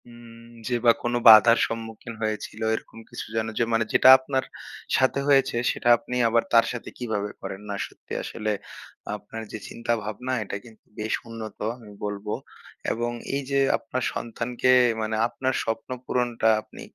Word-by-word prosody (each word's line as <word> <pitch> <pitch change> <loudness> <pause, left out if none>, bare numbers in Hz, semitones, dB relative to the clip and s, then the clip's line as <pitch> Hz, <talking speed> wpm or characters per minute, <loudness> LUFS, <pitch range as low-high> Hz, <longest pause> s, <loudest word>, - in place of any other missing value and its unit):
উম 115 -1 -14 0.2
যে 125 - 0
বা 120 - +9
কোন 120 - -1
বাধার 115 +1 +9
সম্মুখীন 115 0 -7
হয়েছিল 110 0 -3
এরকম - - -9
কিছু - - -6
যেন 110 0 0
যে - - +3
মানে 115 0 +2
যেটা 130 - +7
আপনার 130 0 -1 0.5
সাথে 130 +1 +2
হয়েছে 135 -4 +4 0.2
সেটা 120 - -1
আপনি 125 - -6
আবার 115 0 +3
তার 115 -1 +7
সাথে 120 - -6
কিভাবে 105 -4 -2
করেন? 95 - -6
না 100 - -2
সত্যি - - -12
আসলে 110 0 -3 0.6
আপনার 105 +2 -8
যে - - -4
চিন্তা-ভাবনা 115 +2 -3
এটা 100 - -5
কিন্তু 110 -2 -17
বেশ 110 +1 -2
উন্নত 115 -1 -8 0.2
আমি 110 -3 -13
বলবো 105 0 -4 0.6
এবং 120 +1 -1 0.2
এই 140 - 0
যে 140 - +3 0.2
আপনার 125 +2 -4
সন্তানকে 120 +2 -1 0.3
মানে 110 0 -1
আপনার 130 +2 -2
স্বপ্ন 115 +1 -3 0.2
পূরণটা 120 -3 +1
আপনি - - -14
115 Hz, 160 wpm, -25 LUFS, 110-120 Hz, 0.6 s, বা